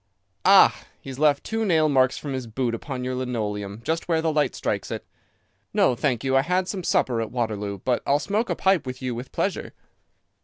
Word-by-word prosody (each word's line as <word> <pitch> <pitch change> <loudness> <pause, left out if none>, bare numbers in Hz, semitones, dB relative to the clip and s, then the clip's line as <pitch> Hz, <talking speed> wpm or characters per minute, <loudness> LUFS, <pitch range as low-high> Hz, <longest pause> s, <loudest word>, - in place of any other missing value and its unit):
"Ah! - - +6 0.2
He 135 - -9
has 130 - -9
left 150 -1 +3
two 225 0 -2
nail 160 -6 +3
marks 130 -3 +3
from 145 -2 -5
his 130 -2 -4
boot 120 +1 -2
upon 125 +2 -5
your 130 0 -2
linoleum 105 -5 -3
just 165 +5 -2
where 165 -2 +2
the 160 -1 0
light 150 -4 +1
strikes - - -2
it. - - -5 0.7
No, - - +4
thank 125 -1 -1
you, 135 0 +1
I 135 - +5
had 180 +4 0
some 190 -2 -4
supper 120 -7 +1
at 110 -1 -4
Waterloo, 105 -4 -2
but 125 -2 +1
I'll 140 - +4
smoke 210 +9 -1
a - - 0
pipe 190 -7 +2
with 130 +1 -6
you 125 -1 -2
with 120 +3 -7
pleasure." - - -2
130 Hz, 215 wpm, -24 LUFS, 120-155 Hz, 0.7 s, Ah